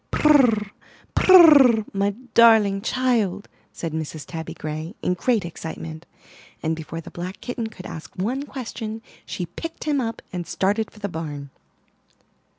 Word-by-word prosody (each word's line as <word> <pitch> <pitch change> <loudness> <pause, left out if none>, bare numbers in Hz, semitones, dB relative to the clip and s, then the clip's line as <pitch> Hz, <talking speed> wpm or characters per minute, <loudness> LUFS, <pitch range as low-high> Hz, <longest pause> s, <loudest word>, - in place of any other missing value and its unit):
'Turr, 245 -9 +4 0.4
purr, 290 - +7
my 200 0 +1 0.2
darling 220 -4 +5
child," 225 -5 0 0.2
said 165 -2 -5
Mrs. 155 -1 -5
Tabby 160 -2 -7
Gray, 155 +5 -6
in 180 - +1
great 215 +2 0
excitement; 160 -1 -7 0.6
and 160 0 0
before 165 +1 -7
the - - -12
black 180 +2 -6
kitten 245 -2 -4
could 200 -4 -11
ask 160 - -8
one 235 +9 -2
question 225 -4 -6 0.2
she 180 - -4
picked 325 - -8
him 290 -3 0
up 225 -2 -4
and 175 -2 -4
started 205 +3 0
for - - -21
the 205 -1 -4
barn. 150 -5 -6
200 Hz, 145 wpm, -23 LUFS, 165-235 Hz, 0.6 s, purr